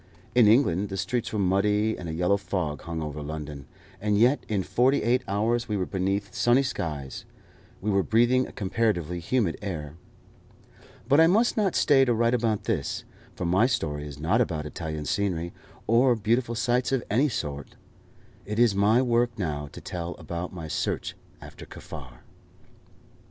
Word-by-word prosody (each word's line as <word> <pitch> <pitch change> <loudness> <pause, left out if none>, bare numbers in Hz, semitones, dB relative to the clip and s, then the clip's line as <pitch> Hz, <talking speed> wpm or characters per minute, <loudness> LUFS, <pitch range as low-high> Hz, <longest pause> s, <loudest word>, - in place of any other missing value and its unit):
In 120 -3 +6
England 105 -5 +3
the 95 - -4
streets 120 +3 -2
were 110 - -2
muddy, 105 +3 +2
and 85 - -7
a - - -3
yellow 90 +4 +2
fog 90 -6 -3
hung 80 -1 -4
over 75 0 -5
London, 75 -2 -6 0.3
and 105 0 +1
yet 125 +7 +3
in 100 -3 0
forty 130 +8 +2
eight 125 +3 +2
hours 115 +4 0
we 105 - 0
were 95 - -1
beneath 95 +1 -2
sunny 120 +3 +3
skies, 75 - -4 0.6
we 105 +2 0
were 100 0 +3
breathing 120 +5 +3
a - - -11
comparatively 95 -5 -1
humid 95 0 0
air. 80 -8 -5 1.1
But 140 +3 +5
I 165 - +7
must 220 +7 +3
not 205 -5 +1
stay 135 -3 +5
to 120 -2 +2
write 115 +1 +2
about 115 -3 0
this, 95 -12 -2 0.3
for 90 - -4
my 95 +7 +3
story 75 - -2
is 70 -1 -9
not 85 +10 +2
about 80 -9 -1
Italian 80 -1 -5
scenery, 85 -2 -1 0.3
or 120 +2 +4
beautiful 115 +2 0
sights 120 +2 +1
of 135 -3 +1
any 135 +8 +3
sort. 70 - -5 0.7
It 105 +1 -5
is 120 -3 +4
my 105 +5 +3
work 120 -1 +1
now 75 -6 -3
to - - -10
tell 85 -2 -5
about 85 +1 -5
my 85 -3 -7
search - - -2 0.3
after - - -11
Kaffar. 65 -5 -10
100 Hz, 170 wpm, -26 LUFS, 85-120 Hz, 1.1 s, I